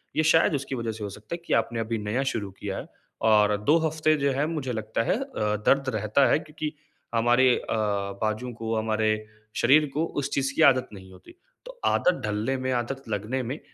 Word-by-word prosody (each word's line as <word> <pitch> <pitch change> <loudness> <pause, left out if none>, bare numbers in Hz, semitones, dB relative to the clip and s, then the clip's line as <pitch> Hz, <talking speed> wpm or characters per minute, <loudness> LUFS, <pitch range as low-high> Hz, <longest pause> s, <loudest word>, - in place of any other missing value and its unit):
ये 155 - +2
शायद 160 +1 +4
उसकी 135 -1 -3
वज़ह 115 -2 -3
से 110 -1 -8
हो 100 - -3
सकता 105 - -9
है - - -6
कि - - -1
आपने 115 0 +1
अभी 115 0 -2
नया 105 +5 -1
शुरू 100 -3 -4
किया 100 -2 -4
है - - -7 0.4
और 105 -1 +5
2 150 +8 +5
हफ़्ते 155 0 +2
जो 140 - +3
है 140 +3 0
मुझे 150 -6 -3
लगता 110 0 -2
है 195 - +1
अ, - - -2 0.4
दर्द 135 -1 +3
रहता 110 +6 +3
है - - +4
क्योंकि 155 0 -6 0.4
हमारे 120 +2 +4
अ, - - -8 0.6
बाजू 110 +3 -1
को, 115 0 -3
हमारे 110 -1 0 0.4
शरीर 145 +6 +5
को 155 +3 0 0.2
उस 135 - -3
चीज़ 135 -1 0
की - - +1
आदत 130 -1 -2
नहीं 95 -2 -12
होती, 95 - -16 0.3
तो - - -11
आदत 180 -1 +2
ढलने 105 +5 -1
में, 130 0 -2
आदत 130 +2 -2
लगने 110 +5 -2
में 130 +6 -4
120 Hz, 210 wpm, -26 LUFS, 110-140 Hz, 0.6 s, और